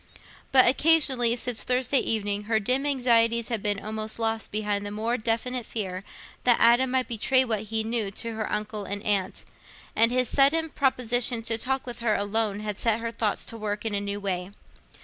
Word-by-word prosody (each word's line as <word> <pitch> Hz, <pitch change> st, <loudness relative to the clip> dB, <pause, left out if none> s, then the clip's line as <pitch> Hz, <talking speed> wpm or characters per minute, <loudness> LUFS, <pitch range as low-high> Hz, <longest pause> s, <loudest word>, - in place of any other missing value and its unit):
But 260 Hz, -1 st, +6 dB
occasionally, 265 Hz, -4 st, +3 dB
since 245 Hz, -1 st, -2 dB
Thursday 255 Hz, +2 st, +1 dB
evening, 205 Hz, -2 st, -1 dB
her 220 Hz, 0 st, +1 dB
dim 255 Hz, +7 st, 0 dB
anxieties 235 Hz, -4 st, +2 dB
had 230 Hz, -4 st, -2 dB
been 205 Hz, -1 st, -1 dB
almost 215 Hz, +1 st, -3 dB
lost 225 Hz, -1 st, -2 dB
behind 210 Hz, -1 st, -1 dB
the 205 Hz, -, -5 dB
more 220 Hz, +3 st, -2 dB
definite 240 Hz, +2 st, -2 dB
fear 190 Hz, -4 st, -5 dB, 0.4 s
that 245 Hz, -2 st, +4 dB
Adam 240 Hz, +3 st, +4 dB
might 255 Hz, 0 st, 0 dB
betray 255 Hz, +3 st, +2 dB
what 220 Hz, -3 st, -2 dB
he 220 Hz, 0 st, 0 dB
knew 225 Hz, -2 st, 0 dB
to 230 Hz, +3 st, -5 dB
her 220 Hz, -1 st, -4 dB
uncle 210 Hz, 0 st, -2 dB
and 200 Hz, +1 st, -5 dB
aunt, 195 Hz, -2 st, -1 dB, 0.5 s
and 230 Hz, +2 st, +5 dB
his 250 Hz, 0 st, +1 dB
sudden 305 Hz, +6 st, +3 dB
proposition 245 Hz, -4 st, 0 dB
to 225 Hz, 0 st, 0 dB
talk 265 Hz, +4 st, -2 dB
with 240 Hz, -1 st, -7 dB
her 230 Hz, -3 st, +1 dB
alone 205 Hz, 0 st, -1 dB
had 210 Hz, -1 st, -4 dB
set 230 Hz, -1 st, +1 dB
her 230 Hz, 0 st, -4 dB
thoughts 220 Hz, -3 st, -2 dB
to 230 Hz, -, -6 dB
work 210 Hz, 0 st, -4 dB
in 220 Hz, -, -2 dB
a 200 Hz, -, 0 dB
new 200 Hz, 0 st, -4 dB
way. 185 Hz, -2 st, -3 dB
225 Hz, 190 wpm, -26 LUFS, 210-245 Hz, 0.5 s, But